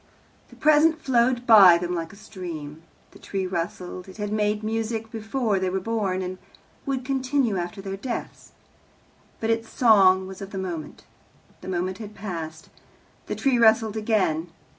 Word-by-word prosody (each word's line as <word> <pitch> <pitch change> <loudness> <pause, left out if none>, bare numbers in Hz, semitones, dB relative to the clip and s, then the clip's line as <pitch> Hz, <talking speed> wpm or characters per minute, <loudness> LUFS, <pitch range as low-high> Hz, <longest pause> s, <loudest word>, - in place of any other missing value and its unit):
The - - -16
present 310 +1 +4
flowed 245 -3 +1
by 195 -7 +9
them 175 +1 -3
like 165 -2 -4
a - - -14
stream. 170 -8 -8 0.3
The - - -16
tree 195 -1 -3
rustled. 180 +1 -5
It 190 - -12
had 205 -1 -3
made 210 0 0
music 225 0 -3
before 220 -2 -1
they 185 0 0
were 190 +1 -1
born, 195 -3 -1
and 185 0 -5 0.5
would 265 -2 -2
continue 265 -4 0
after 180 +3 -5
their 195 0 -5
deaths, 240 +4 -6 0.9
but 225 0 0
its 225 0 -1
song 195 -6 +5
was 190 +1 -9
of 195 - -6
the 200 - -7
moment. 175 -5 -5 0.6
The - - -10
moment 185 +1 -2
had 210 -1 -9
passed. 165 -6 -6 0.6
The - - -3
tree 265 -4 +1
rustled 220 -1 +4
again. 205 -7 0
205 Hz, 160 wpm, -25 LUFS, 185-225 Hz, 0.9 s, by